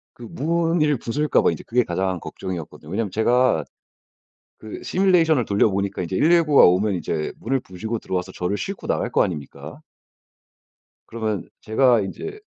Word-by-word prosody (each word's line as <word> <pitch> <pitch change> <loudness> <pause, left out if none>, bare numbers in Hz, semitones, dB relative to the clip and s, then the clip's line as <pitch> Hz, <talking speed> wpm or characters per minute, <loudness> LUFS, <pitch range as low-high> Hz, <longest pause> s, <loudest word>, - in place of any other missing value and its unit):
그 120 - -12
문을 165 -1 +1
부술까 145 +5 +1
봐 - - +3
이제 - - -6
그게 125 +1 +2
가장 95 -1 -2
걱정이었거든요. 85 -3 -7
왜냐하면 100 -1 -2
제가 125 +4 +2 1.0
그 110 -1 -9
시뮬레이션을 170 -8 +3
돌려 100 +1 +2
보니까 100 0 -2
이제 90 +2 -3
119 165 - +3
가 - - +9
오면 95 +3 +3
이제 80 -3 -3
문을 130 +3 -1
부수고 110 +2 -5
들어 - - -6
와서 90 +1 -4
저를 90 +3 -2
싣고 90 - -6
나갈 - - -1
거 - - +3
아닙니까? 75 -6 -6 1.3
그러면 110 -4 -3
제가 120 +1 +3
인제 405 - -6
110 Hz, 345 characters per minute, -22 LUFS, 95-145 Hz, 1.3 s, 가